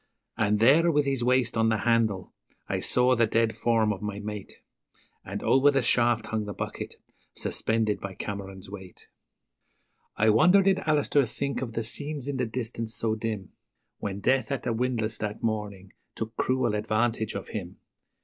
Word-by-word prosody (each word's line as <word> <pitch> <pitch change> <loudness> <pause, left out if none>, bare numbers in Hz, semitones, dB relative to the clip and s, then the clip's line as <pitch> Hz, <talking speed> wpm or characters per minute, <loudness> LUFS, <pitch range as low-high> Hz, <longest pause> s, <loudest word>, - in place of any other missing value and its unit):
And 105 -1 +2
there, 145 +10 +5
with 145 -2 +2
his 135 -3 0
waist 125 -1 +2
on 115 0 +3
the 110 - +2
handle, 110 -4 +1 0.3
I - - -1
saw 125 +1 +3
the 115 -1 +3
dead 115 0 +1
form 115 -2 +2
of 95 - -9
my 105 -1 -4
mate, 105 -1 -7 0.6
And - - -6
over 135 +2 +5
the 135 -2 +2
shaft 120 -1 +2
hung 110 -1 -2
the 105 -2 -6
bucket, - - -5 0.4
suspended 110 -2 0
by 100 -1 -6
Cameron's 95 -1 -6
weight. 95 -2 -11 1.1
I 110 0 +4
wonder 180 - +6
did 190 0 +3
Alister 145 -2 +3
think 140 +4 -3
of 120 -3 -4
the 115 - -2
scenes 145 +4 -4
in 140 -2 -2
the 125 -2 0
distance 115 -1 -4
so 110 -1 0
dim, 110 -4 -4 0.5
When 100 0 -4
Death 130 +5 +2
at 135 - -2
the 120 - 0
windlass 115 -2 -1
that 105 0 -4
morning 105 -4 -3 0.2
took 110 0 -5
cruel 130 -3 +1
advantage 110 +1 0
of - - -5
him? 90 -5 -6
115 Hz, 170 wpm, -27 LUFS, 105-125 Hz, 1.1 s, wonder